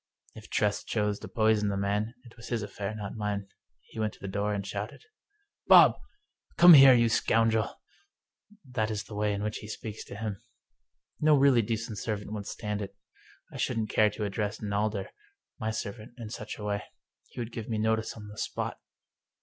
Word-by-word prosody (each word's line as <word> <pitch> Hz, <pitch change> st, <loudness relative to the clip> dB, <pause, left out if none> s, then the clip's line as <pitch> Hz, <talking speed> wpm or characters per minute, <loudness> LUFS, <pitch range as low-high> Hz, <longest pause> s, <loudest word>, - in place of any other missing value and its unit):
If -, -, -12 dB
Tress 105 Hz, -1 st, +1 dB
chose 105 Hz, -2 st, -1 dB
to -, -, -8 dB
poison 110 Hz, -2 st, +2 dB
the 100 Hz, -, -1 dB
man, 105 Hz, +4 st, -1 dB
it 115 Hz, -, -15 dB
was 115 Hz, -, -11 dB
his 115 Hz, -3 st, -2 dB
affair, 105 Hz, +1 st, -5 dB
not 105 Hz, -2 st, -5 dB
mine. 105 Hz, -2 st, -3 dB, 0.3 s
He -, -, -11 dB
went 110 Hz, -1 st, -1 dB
to -, -, -17 dB
the 100 Hz, -, -6 dB
door 100 Hz, +2 st, -1 dB
and 100 Hz, -2 st, -2 dB
shouted: 100 Hz, +2 st, -5 dB, 0.3 s
" 410 Hz, 0 st, -48 dB
Bob! -, -, +8 dB, 0.6 s
Come 175 Hz, 0 st, +10 dB
here, 135 Hz, -3 st, +10 dB
you 115 Hz, -1 st, +4 dB
scoundrel! 115 Hz, -1 st, +1 dB, 0.4 s
" 210 Hz, -4 st, -29 dB
That 110 Hz, -1 st, +1 dB
is 105 Hz, -1 st, -3 dB
the 105 Hz, -, -12 dB
way 105 Hz, 0 st, 0 dB
in 100 Hz, 0 st, -2 dB
which 105 Hz, 0 st, -2 dB
he 105 Hz, -, -9 dB
speaks 110 Hz, 0 st, -6 dB
to -, -, -9 dB
him. 105 Hz, -2 st, -4 dB, 0.8 s
No 150 Hz, -1 st, +5 dB
really 135 Hz, -3 st, +5 dB
decent 115 Hz, 0 st, -3 dB
servant 105 Hz, -1 st, -4 dB
would 105 Hz, -2 st, -5 dB
stand 105 Hz, -1 st, -4 dB
it. 100 Hz, 0 st, -7 dB, 0.6 s
I -, -, -7 dB
shouldn't 115 Hz, -4 st, -1 dB
care 105 Hz, -1 st, +4 dB
to 105 Hz, -, -4 dB
address 105 Hz, +1 st, -2 dB
Nalder, 105 Hz, -1 st, -1 dB, 0.5 s
my 110 Hz, -, -1 dB
servant, 110 Hz, +1 st, -5 dB
in 115 Hz, -3 st, -7 dB
such 110 Hz, -2 st, -6 dB
a 105 Hz, -, -8 dB
way. 100 Hz, 0 st, -1 dB, 0.5 s
He -, -, -11 dB
would 120 Hz, 0 st, -4 dB
give 115 Hz, -1 st, -6 dB
me 110 Hz, -, -1 dB
notice 110 Hz, +1 st, 0 dB
on 105 Hz, -2 st, -10 dB
the 105 Hz, +1 st, -10 dB
spot. -, -, -3 dB
105 Hz, 200 wpm, -29 LUFS, 105-115 Hz, 0.8 s, Come